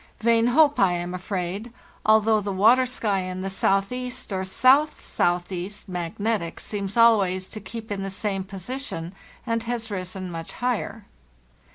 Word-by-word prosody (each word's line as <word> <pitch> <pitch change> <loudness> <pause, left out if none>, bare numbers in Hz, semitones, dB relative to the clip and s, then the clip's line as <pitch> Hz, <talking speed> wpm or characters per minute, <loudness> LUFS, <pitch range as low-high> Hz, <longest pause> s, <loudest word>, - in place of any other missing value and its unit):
Vain 230 +1 +3
hope, 290 +3 +4
I 190 -3 +4
am 175 +1 -3
afraid, 185 +4 -4 0.3
although 220 0 +4
the 200 0 -3
water 230 +7 +5
sky 210 -5 0
in 185 0 -4
the 195 0 -3
southeast 230 +5 -1
or 190 0 -1
south 265 +10 +3
southeast 180 +3 -2
(magnetic) 180 +1 -2
seems. 200 0 -4
al 230 -1 +7
ways 185 -1 -1
to 215 - -7
keep 220 +2 -8
in 200 -1 -2
the 195 - -3
same 195 0 -2
position 190 -2 -5 0.3
and 230 -1 0
has 230 -2 -3
risen 185 -1 -4
much 165 -1 -7
higher. 225 -3 -2
200 Hz, 155 wpm, -25 LUFS, 185-230 Hz, 0.3 s, al